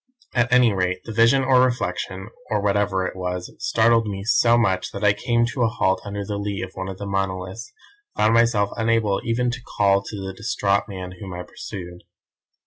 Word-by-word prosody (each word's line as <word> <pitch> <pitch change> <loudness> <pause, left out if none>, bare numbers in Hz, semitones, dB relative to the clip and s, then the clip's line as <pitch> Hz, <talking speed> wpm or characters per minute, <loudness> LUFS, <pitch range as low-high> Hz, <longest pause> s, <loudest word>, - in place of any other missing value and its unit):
"At 120 -1 +1
any 125 -3 +5
rate 90 -1 -1
the - - -7
vision 115 +5 +4
or 130 -1 +5
reflection, 115 -5 -1 0.2
or 105 - +1
whatever 100 -2 +1
it - - -4
was, 90 -1 -4
startled 115 0 +3
me 100 -1 -4
so 115 +1 +4
much 95 -6 +1
that 100 - -5
I 105 -1 +5
came 120 +3 +1
to 130 - -3
a 115 - +4
halt 95 -4 0
under 100 0 -5
the 100 0 -3
lee 100 -2 -3
of 95 - -6
one 95 0 -5
of 95 - -7
the 100 - -6
monoliths, 95 +2 -3 0.4
and - - 0
found 110 +1 +4
myself 115 -3 +3
unable 115 -3 +1
even 120 +1 0
to 125 0 -6 0.2
call 100 -1 +4
to 105 - -8
the 95 0 -5
distraught 100 -2 0
man 95 -2 -7
whom 95 -3 -7
I 90 - -5
pursued. 90 -1 -9
100 Hz, 205 wpm, -23 LUFS, 95-115 Hz, 0.4 s, any